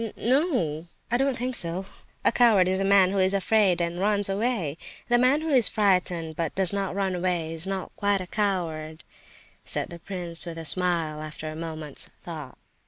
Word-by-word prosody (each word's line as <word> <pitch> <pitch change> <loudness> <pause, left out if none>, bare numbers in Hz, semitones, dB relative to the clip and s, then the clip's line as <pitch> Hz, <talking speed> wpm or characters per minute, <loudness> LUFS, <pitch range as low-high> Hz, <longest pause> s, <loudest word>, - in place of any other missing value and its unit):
"N 225 -2 -5
no!—I 235 - -1
don't 270 -1 0
think 250 +1 -3
so. 175 +1 0 0.4
A - - +5
coward 220 -7 +4
is 190 +1 +1
a - - 0
man 195 -1 +4
who 200 - 0
is 190 +1 +3
afraid 195 -1 +2
and 170 0 -2
runs 205 0 +1
away; 195 - -1 0.3
the 240 0 +4
man 260 +5 +3
who 320 - -3
is 250 -9 +6
frightened 180 -6 0
but 165 -1 -3
does 190 -1 +4
not 195 -2 -2
run 195 -2 -1
away, 175 -3 -1
is 165 +3 -2
not 195 -1 -5
quite 200 -1 +1
a 185 - -5
coward," 170 -6 -3 0.6
said - - 0
the 170 - -8
prince 175 -2 -4
with 165 -1 -6
a 165 - -6
smile, 165 -2 +2
after 155 0 -7
a 155 - -7
moment's 155 -2 -3
thought. 155 -6 -8
185 Hz, 190 wpm, -25 LUFS, 165-205 Hz, 0.6 s, is